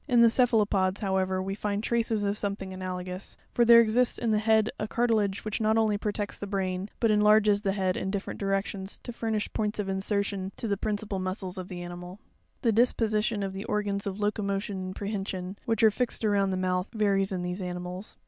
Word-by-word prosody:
In 245 -4 +5
the 230 -1 +7
cephalopods, 210 -6 +2
however, 190 -1 0
we 195 +1 -3
find 205 +1 -2
traces 225 -2 0
of 200 0 0
something 200 -2 -4
analogous; 185 0 -5 0.2
for 240 - +4
there 235 0 +9
exists 235 +2 +2
in 230 -2 0
the 210 - +3
head 220 0 +3
a 215 - -2
cartilage 215 -4 +1
which 215 +1 -2
not 220 +1 +3
only 220 -2 +3
protects 205 0 -3
the 205 - -5
brain, 190 -1 -2
but 230 -2 +3
enlarges 210 -1 +5
the 195 -2 0
head 190 -2 0
in 190 - -2
differ 200 0 -3
ent - - -9
directions, 195 0 -2
to 240 - -6
furnish 220 -2 -2
points 210 -1 -1
of 205 -2 -2
insertion 195 0 -1
to 230 - -3
the 200 - +1
principal 205 -1 -2
mus 185 +3 -2
cles 185 +1 -5
of 180 - -6
the 180 -2 -6
animal. 175 +1 -8
10. 210 - -26 0.4
The 230 - +4
disposition 220 -2 +2
of 195 -1 -3
the 195 +3 -6
organs 205 -1 -1
of 195 +1 -4
locomotion 205 -1 -1
and 185 - -6
prehen 200 -1 -3
sion, 185 +1 -5
which 225 0 0
are 220 - +7
fixed 235 0 -1
around 200 -2 +2
the 190 - -1
mouth, 185 0 0
varies 200 -2 +2
in 180 -2 -2
these 180 +2 -3
animals. 180 +2 -5
200 Hz, 215 wpm, -28 LUFS, 190-215 Hz, 0.4 s, there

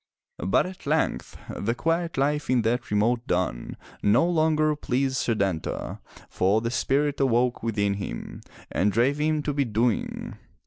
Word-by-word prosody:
But 95 - +2
at 185 0 -9
length - - 0 0.2
the 115 +4 -1
quiet 165 +4 -1
life 150 +1 0
in 125 -3 +3
that 120 +2 0
remote 115 +4 +1
dun 90 -9 -1 0.2
no 105 +10 +4
longer 155 -2 +2
pleased 130 -1 -1
Setanta, 100 -9 -1 0.3
for 100 +4 +2
the 115 +1 -2
spirit 140 +3 +1
awoke 125 -2 +2
within 105 -3 0
him 100 -11 -6 0.3
and 105 +2 +2
drave 125 +8 +2
him 155 0 +1
to 145 - -1
be 140 0 +2
doing. 115 -1 -1
125 Hz, 145 wpm, -26 LUFS, 105-150 Hz, 0.3 s, no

